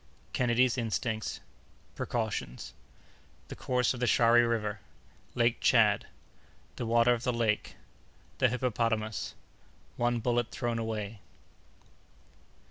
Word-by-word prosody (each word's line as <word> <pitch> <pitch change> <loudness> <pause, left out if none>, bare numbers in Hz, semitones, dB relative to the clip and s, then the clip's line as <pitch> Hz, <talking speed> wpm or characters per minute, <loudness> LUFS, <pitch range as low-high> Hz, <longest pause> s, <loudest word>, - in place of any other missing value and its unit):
—Kennedy's 125 +1 +2
Instincts.—Precautions.—The 70 - -6
Course 125 0 0
of 125 - -7
the 125 - +1
Shari 120 0 +5
River.—Lake 115 +1 -3
Tchad.—The 120 - 0
Water 115 +1 +4
of 120 - -3
the 125 - 0
Lake.—The 115 -3 -3
Hippopotamus.—One 115 0 -3
Bullet 120 0 0
thrown 120 -1 -2
away. 110 -2 -4
115 Hz, 75 wpm, -30 LUFS, 110-120 Hz, -, Shari